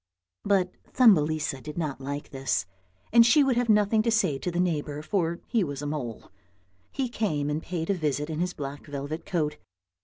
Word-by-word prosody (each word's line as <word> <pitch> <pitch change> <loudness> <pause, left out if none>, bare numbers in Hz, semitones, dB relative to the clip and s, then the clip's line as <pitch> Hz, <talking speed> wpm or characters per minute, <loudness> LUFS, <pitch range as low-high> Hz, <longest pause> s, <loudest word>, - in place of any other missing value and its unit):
But 190 -3 +2 0.2
Thumbelisa 155 - +4
did 150 +3 -8
not 150 -5 -3
like 140 +2 -5
this, 135 -1 -1 0.5
and 235 0 +9
she 285 +6 +5
would 270 -2 +2
have 245 -1 0
nothing 210 +1 +4
to 230 - 0
say 215 -11 +2
to 180 - -2
the 175 0 -2
neighbour, 150 -4 -1
for 170 -2 -1
he 230 -4 +1
was 145 -3 -4
a - - -3
mole. 140 -7 -5 0.6
He 265 -2 -1
came 155 -12 -1
and 150 +2 -1
paid 170 +1 -2
a - - +3
visit 150 -4 -1
in 160 -1 -4
his 180 +1 -1
black 140 +1 -6
velvet 145 +3 -5
coat. 150 -5 -1
160 Hz, 190 wpm, -27 LUFS, 145-200 Hz, 0.6 s, and